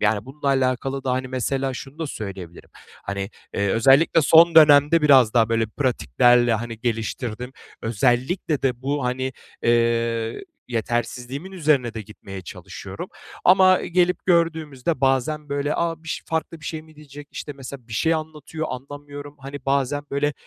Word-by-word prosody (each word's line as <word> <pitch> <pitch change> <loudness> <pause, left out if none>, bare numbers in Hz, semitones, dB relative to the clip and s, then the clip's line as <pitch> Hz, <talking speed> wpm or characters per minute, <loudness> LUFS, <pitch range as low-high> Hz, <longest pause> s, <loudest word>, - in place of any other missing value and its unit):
Yani, 105 0 +1
bununla 140 +2 -8
alakalı 135 0 0
da, 130 - 0
hani, 130 0 -2
mesela 130 +1 -2
şunu 135 +4 -9
da 160 - -3
söyleyebilirim, 95 -8 -8 0.3
hani, 100 +1 -4 0.2
eee, 100 0 0
özellikle 135 - +4
son 165 +3 +6
dönemde 150 +1 +7
biraz 130 -6 +5
daha 115 -2 +4
böyle 115 -1 +1
pratiklerle, 120 - +2
hani, 115 0 -5
geliştirdim. 120 +1 -3 0.3
Özellikle 130 - 0
de 125 -2 -1
bu, 140 -1 -1
hani, 130 +1 -2 0.3
eee, 115 - +1 0.2
yetersizliğimin 125 - -3
üzerine 145 -9 +1
de 110 - -5
gitmeye 95 -2 -10
çalışıyorum. - - -8 0.4
Ama, 185 0 +6
e, - - -5
gelip 180 +1 +1
gördüğümüzde 160 -5 0
bazen 140 +3 0
böyle, 140 +1 -1
"A, 165 -1 -2
biş 160 - -5
farklı 160 0 -3
bir - - -13
şey 155 -1 -4
mi 155 -1 -20
diyecek?" 145 -1 -12
işte, 145 - -6
mesela, 130 -3 -10
bir - - -10
şey 160 +9 +2
anlatıyor, 155 0 -5
anlamıyorum. 145 +2 -8
Hani, 135 +1 -8
bazen, 140 +1 0
böyle, 145 +1 0
135 Hz, 150 wpm, -23 LUFS, 120-150 Hz, 0.4 s, dönemde